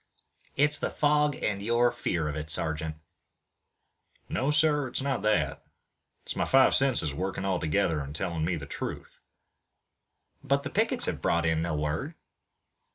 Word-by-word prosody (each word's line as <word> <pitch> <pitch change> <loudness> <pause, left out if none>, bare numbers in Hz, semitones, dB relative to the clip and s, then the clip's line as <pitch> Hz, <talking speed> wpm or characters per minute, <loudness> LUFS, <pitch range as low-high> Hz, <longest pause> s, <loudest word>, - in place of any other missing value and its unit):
"It's 150 +1 +3
the - - -1
fog 150 -1 +2
and 100 -1 -1
your 120 +3 +2
fear 80 -3 -2
of 75 - -3
it, 75 0 -5
sergeant." 80 0 0 1.3
"No, 135 - 0
sir; 150 -2 +3
it's 125 +2 -2
not 135 -6 -1
that. 80 -10 0 0.6
It's - - -3
my - - 0
five 135 0 +5
senses 130 - +2
working 95 +4 -3
all 95 -2 0
together 80 +1 +1
and 70 +1 -6
telling 80 0 -2
me 85 +2 0
the 75 -4 -6
truth." 70 - -7 1.2
"But - - +1
the - - -5
pickets - - +1
have - - -2
brought 85 0 +1
in 80 0 +1
no 85 -1 -1
word." 75 - -2
90 Hz, 160 wpm, -28 LUFS, -, 1.3 s, five